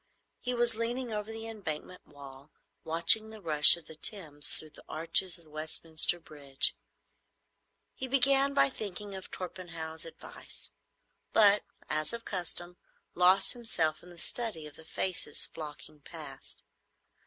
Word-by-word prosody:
He 250 Hz, -1 st, -3 dB
was 240 Hz, -1 st, +2 dB
leaning 235 Hz, +1 st, -3 dB
over 210 Hz, +1 st, -4 dB
the 225 Hz, 0 st, -7 dB
Embankment 180 Hz, -5 st, -7 dB
wall, 140 Hz, 0 st, -13 dB, 0.3 s
watching 170 Hz, +7 st, +4 dB
the 220 Hz, 0 st, -10 dB
rush 155 Hz, -3 st, +8 dB
of 170 Hz, -, -12 dB
the -, -, -11 dB
Thames 155 Hz, -4 st, -2 dB
through 155 Hz, -, -1 dB
the -, -, -15 dB
arches 165 Hz, +3 st, +1 dB
of 170 Hz, -, -17 dB
Westminster 155 Hz, +2 st, -1 dB
Bridge. 145 Hz, -4 st, -1 dB, 1.2 s
He 260 Hz, -, -5 dB
began 275 Hz, +1 st, +3 dB
by 140 Hz, 0 st, +4 dB
thinking 205 Hz, -1 st, -6 dB
of 190 Hz, -1 st, -8 dB
Torpenhow's 165 Hz, -3 st, -7 dB
advice, 165 Hz, -, -12 dB, 0.6 s
but, 210 Hz, -1 st, +6 dB, 0.3 s
as 155 Hz, +6 st, -2 dB
of 230 Hz, 0 st, -6 dB
custom, 175 Hz, -1 st, 0 dB, 0.4 s
lost 185 Hz, +2 st, +5 dB
himself 195 Hz, -10 st, -1 dB
in 180 Hz, -, -15 dB
the 175 Hz, -, -14 dB
study 180 Hz, -2 st, -4 dB
of 150 Hz, -1 st, -11 dB
the 160 Hz, -, -14 dB
faces 175 Hz, -3 st, -1 dB
flocking 150 Hz, -1 st, -10 dB
past. -, -, -10 dB
175 Hz, 140 wpm, -31 LUFS, 155-220 Hz, 1.2 s, rush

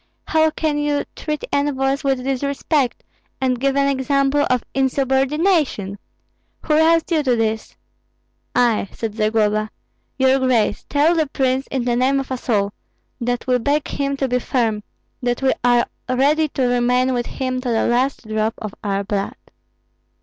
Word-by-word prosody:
How 315 Hz, 0 st, +3 dB
can 310 Hz, -1 st, -1 dB
you 295 Hz, -1 st, 0 dB
treat 300 Hz, -1 st, -4 dB
envoys 275 Hz, -1 st, 0 dB
with 270 Hz, -2 st, 0 dB
disrespect, 275 Hz, 0 st, -1 dB, 0.4 s
and 255 Hz, -2 st, 0 dB
give 275 Hz, +1 st, +1 dB
an 280 Hz, 0 st, +3 dB
example 275 Hz, +1 st, +1 dB
of 250 Hz, -2 st, +1 dB
insubordination? 270 Hz, -, +1 dB, 0.6 s
Who 310 Hz, -, 0 dB
roused 325 Hz, +2 st, +3 dB
you 320 Hz, -2 st, +3 dB
to 255 Hz, -4 st, +2 dB
this?" 220 Hz, -1 st, -2 dB, 0.8 s
"I," 230 Hz, -5 st, +2 dB
said 225 Hz, -2 st, -4 dB
Zagloba. 215 Hz, -1 st, +1 dB, 0.5 s
"Your 265 Hz, 0 st, +4 dB
grace, 245 Hz, -5 st, +1 dB
tell 300 Hz, +4 st, +3 dB
the 320 Hz, -3 st, +1 dB
prince, 265 Hz, 0 st, 0 dB
in 260 Hz, -3 st, -2 dB
the 240 Hz, -1 st, +1 dB
name 265 Hz, +3 st, +2 dB
of 270 Hz, -1 st, -6 dB
us 255 Hz, 0 st, -5 dB
all, 200 Hz, -3 st, +1 dB, 0.5 s
that 245 Hz, 0 st, -2 dB
we 250 Hz, -1 st, +2 dB
beg 285 Hz, +5 st, 0 dB
him 280 Hz, 0 st, -2 dB
to 270 Hz, -, 0 dB
be 250 Hz, 0 st, +1 dB
firm, 230 Hz, -4 st, 0 dB, 0.4 s
that 245 Hz, +1 st, -1 dB
we 265 Hz, -, +4 dB
are 245 Hz, -1 st, +4 dB, 0.2 s
ready 290 Hz, +5 st, +3 dB
to 275 Hz, -2 st, -2 dB
remain 250 Hz, +1 st, +2 dB
with 240 Hz, -1 st, -1 dB
him 255 Hz, -1 st, -3 dB
to 250 Hz, -, -3 dB
the 225 Hz, -1 st, +1 dB
last 245 Hz, 0 st, 0 dB
drop 220 Hz, +1 st, -1 dB
of 215 Hz, -2 st, -6 dB
our 200 Hz, -1 st, -1 dB
blood." 200 Hz, -1 st, -2 dB
260 Hz, 160 wpm, -20 LUFS, 240-280 Hz, 0.8 s, Your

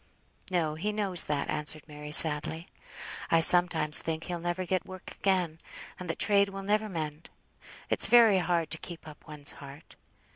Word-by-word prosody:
"No; 170 Hz, -4 st, -1 dB
he 185 Hz, +7 st, -3 dB
knows 200 Hz, -5 st, 0 dB
that," 145 Hz, -1 st, -2 dB
answered 150 Hz, 0 st, -2 dB
Mary, 150 Hz, -1 st, -10 dB
sadly. 160 Hz, +2 st, +3 dB, 0.6 s
"I 165 Hz, -, +3 dB
sometimes 165 Hz, -3 st, +5 dB
think 160 Hz, 0 st, -4 dB
he'll 175 Hz, -1 st, -5 dB
never 175 Hz, +2 st, -4 dB
get 185 Hz, 0 st, -2 dB
work 185 Hz, -1 st, -11 dB
again, 180 Hz, -5 st, -1 dB, 0.4 s
and 180 Hz, -2 st, -8 dB
that 165 Hz, -, -3 dB
trade 200 Hz, -1 st, +2 dB
will 195 Hz, 0 st, -8 dB
never 210 Hz, +2 st, -1 dB
mend. 155 Hz, -3 st, -6 dB, 0.6 s
It's -, -, +2 dB
very 230 Hz, -5 st, +5 dB
hard 170 Hz, -2 st, -2 dB
to 160 Hz, -, -1 dB
keep 170 Hz, -2 st, -9 dB
up 150 Hz, -1 st, -14 dB
one's 150 Hz, -1 st, -1 dB
heart. 140 Hz, +2 st, -13 dB
170 Hz, 170 wpm, -28 LUFS, 155-185 Hz, 0.6 s, sometimes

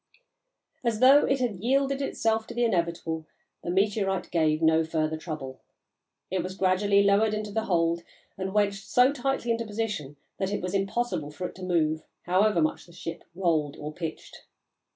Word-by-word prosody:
As 230 Hz, -3 st, 0 dB
though 270 Hz, +4 st, +7 dB
it 270 Hz, 0 st, +2 dB
had 240 Hz, -6 st, -1 dB
yielded 275 Hz, +5 st, +1 dB
itself 225 Hz, -4 st, 0 dB
to -, -, -8 dB
the 240 Hz, -, +1 dB
inevitable, 170 Hz, -6 st, -1 dB, 0.4 s
the -, -, -4 dB
meteorite 195 Hz, +1 st, 0 dB
gave 155 Hz, -2 st, +2 dB
no 160 Hz, 0 st, +4 dB
further 160 Hz, -1 st, -1 dB
trouble. 150 Hz, -5 st, -6 dB, 0.7 s
It 185 Hz, -1 st, +1 dB
was 185 Hz, +2 st, -5 dB
gradually 200 Hz, +2 st, +3 dB
lowered 205 Hz, +2 st, +3 dB
into 210 Hz, -1 st, -4 dB
the 220 Hz, +2 st, -1 dB
hold 170 Hz, -2 st, +1 dB, 0.3 s
and 190 Hz, 0 st, -3 dB
wedged 200 Hz, -1 st, +1 dB
so 250 Hz, +3 st, +4 dB
tightly 270 Hz, -3 st, -1 dB
into 230 Hz, 0 st, 0 dB
position 205 Hz, -10 st, -4 dB, 0.2 s
that 190 Hz, 0 st, -1 dB
it 205 Hz, -, -1 dB
was 180 Hz, 0 st, -3 dB
impossible 195 Hz, -5 st, -1 dB
for 180 Hz, +5 st, -6 dB
it -, -, -12 dB
to 185 Hz, -, -10 dB
move, 160 Hz, -3 st, +1 dB, 0.2 s
however 185 Hz, -1 st, +3 dB
much 155 Hz, -, -2 dB
the 170 Hz, -, -16 dB
ship 165 Hz, -1 st, -7 dB
rolled 160 Hz, -6 st, 0 dB
or 150 Hz, +1 st, -6 dB
pitched. 160 Hz, -1 st, -7 dB
190 Hz, 175 wpm, -27 LUFS, 165-220 Hz, 0.7 s, though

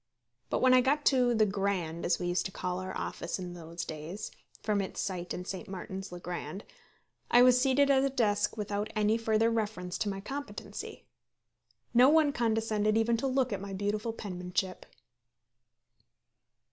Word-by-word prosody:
But -, -, 0 dB
when 255 Hz, 0 st, +6 dB
I 255 Hz, -, +7 dB
got 285 Hz, +3 st, +1 dB
to 250 Hz, -3 st, +4 dB
"The 215 Hz, -1 st, +4 dB
Grand," 195 Hz, -5 st, -1 dB
as 175 Hz, -, +2 dB
we 180 Hz, -, -4 dB
used 175 Hz, +2 st, 0 dB
to -, -, -12 dB
call 180 Hz, -1 st, -3 dB
our 185 Hz, 0 st, -5 dB
office -, -, -4 dB
in 180 Hz, -2 st, -6 dB
those 170 Hz, 0 st, -6 dB
days, 160 Hz, +6 st, -6 dB, 0.3 s
from 210 Hz, -2 st, +1 dB
its 190 Hz, -, -5 dB
site 180 Hz, -2 st, -3 dB
in 180 Hz, -, -4 dB
St. 190 Hz, 0 st, -6 dB
Martin's 190 Hz, 0 st, -6 dB
le 175 Hz, -, -7 dB
Grand, 180 Hz, +3 st, -5 dB, 0.7 s
I 245 Hz, +1 st, +7 dB
was 250 Hz, 0 st, +6 dB
seated 275 Hz, +2 st, +4 dB
at 265 Hz, -1 st, +4 dB
a 275 Hz, -, +2 dB
desk 225 Hz, -5 st, +1 dB
without 210 Hz, 0 st, -2 dB
any 215 Hz, +1 st, +3 dB
further 225 Hz, 0 st, +2 dB
reference 210 Hz, -5 st, -2 dB
to 210 Hz, -, 0 dB
my 195 Hz, -1 st, -4 dB
competency. 270 Hz, 0 st, -7 dB, 0.9 s
No 250 Hz, +3 st, +7 dB
one 310 Hz, -1 st, +5 dB
condescended 220 Hz, -3 st, +1 dB
even 230 Hz, +1 st, +3 dB
to 270 Hz, -, -1 dB
look 260 Hz, -3 st, +1 dB
at 195 Hz, -, -3 dB
my 200 Hz, -1 st, -6 dB
beautiful 205 Hz, +3 st, -1 dB
penmanship. 185 Hz, -3 st, -4 dB
210 Hz, 170 wpm, -30 LUFS, 185-240 Hz, 0.9 s, I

